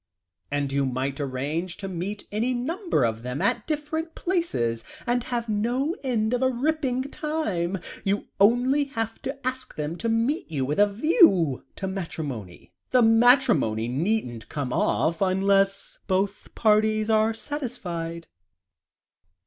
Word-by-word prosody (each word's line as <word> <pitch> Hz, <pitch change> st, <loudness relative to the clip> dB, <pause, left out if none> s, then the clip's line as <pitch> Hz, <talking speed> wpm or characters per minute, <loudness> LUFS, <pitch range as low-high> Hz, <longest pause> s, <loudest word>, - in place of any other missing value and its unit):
And 145 Hz, -1 st, -1 dB
you 140 Hz, 0 st, +1 dB
might 130 Hz, +2 st, -2 dB
arrange 145 Hz, +6 st, -3 dB
to 195 Hz, -, -5 dB
meet 190 Hz, +3 st, -5 dB
any 235 Hz, +5 st, 0 dB
number 325 Hz, -, 0 dB
of 115 Hz, 0 st, -2 dB
them 125 Hz, +3 st, -4 dB
at -, -, 0 dB
different 315 Hz, +1 st, -3 dB
places, 225 Hz, -, -1 dB, 0.2 s
and 245 Hz, 0 st, 0 dB
have 235 Hz, -2 st, -2 dB
no 240 Hz, -, 0 dB
end 230 Hz, -3 st, 0 dB
of 245 Hz, -, +1 dB
a 260 Hz, -, +4 dB
ripping 260 Hz, 0 st, 0 dB
time. 200 Hz, -, -1 dB, 0.3 s
You 200 Hz, +1 st, 0 dB
only 245 Hz, +7 st, +4 dB
have 225 Hz, -5 st, -4 dB
to 270 Hz, 0 st, -6 dB
ask 255 Hz, 0 st, -3 dB
them 155 Hz, +3 st, -3 dB
to 230 Hz, -, -2 dB
meet 230 Hz, -, 0 dB
you 135 Hz, -4 st, -1 dB
with 150 Hz, +6 st, -1 dB
a 205 Hz, -, +7 dB
view 200 Hz, -, +4 dB
to 195 Hz, -, -4 dB
matrimony; 150 Hz, -, -6 dB, 0.2 s
the 250 Hz, -1 st, +4 dB
matrimony 225 Hz, -, +4 dB
needn't 130 Hz, -, -1 dB
come 140 Hz, -4 st, -3 dB
off, 165 Hz, +3 st, +1 dB
unless 195 Hz, +1 st, +2 dB
both 195 Hz, +2 st, -1 dB
parties 215 Hz, 0 st, +3 dB
are 220 Hz, 0 st, +4 dB
satisfied." 175 Hz, -, -5 dB
205 Hz, 140 wpm, -25 LUFS, 160-255 Hz, 0.3 s, a